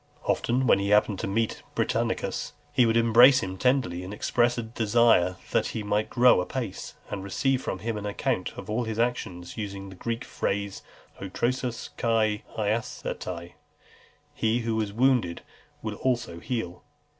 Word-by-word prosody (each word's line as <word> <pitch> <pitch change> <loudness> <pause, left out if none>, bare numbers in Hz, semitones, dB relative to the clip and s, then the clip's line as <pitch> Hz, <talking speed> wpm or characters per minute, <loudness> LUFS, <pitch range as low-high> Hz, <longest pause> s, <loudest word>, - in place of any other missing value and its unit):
Often, 125 +2 +1
when 105 - +5
he 100 0 -1
happened 105 -1 +3
to - - -2
meet 110 +3 -1
Britannicus, - - -1 0.2
he 125 - +5
would 115 0 +3
embrace 120 +3 +7
him 95 0 -4
tenderly, 105 -6 +1
and 90 - -7
express 120 +2 +1
a 120 - -1
desire 110 -4 +3 0.2
"that - - +2
he 110 - -3
might 105 +1 0
grow 125 -5 +5
apace," 110 0 -5 0.2
and 100 -2 -4
receive 130 +7 0
from - - -3
him 115 -1 -3
an 105 0 -4
account 105 -1 -2
of - - -7
all 115 +3 -1
his 110 -1 -4
actions: 110 -7 -2
using 100 -2 -5
the 95 - -11
Greek 115 +5 -3
phrase, 100 0 -2 0.4
"o 100 - -4
trosas 120 +3 -2
kai 110 -2 +1 0.2
iasetai, 100 -5 -3 0.8
He 115 +2 +1
who 115 -1 -1
has 105 -2 -1
wounded 120 -6 +2 0.4
will - - -4
also 120 -10 -1
heal." 90 -5 -4
110 Hz, 160 wpm, -27 LUFS, 100-120 Hz, 0.8 s, embrace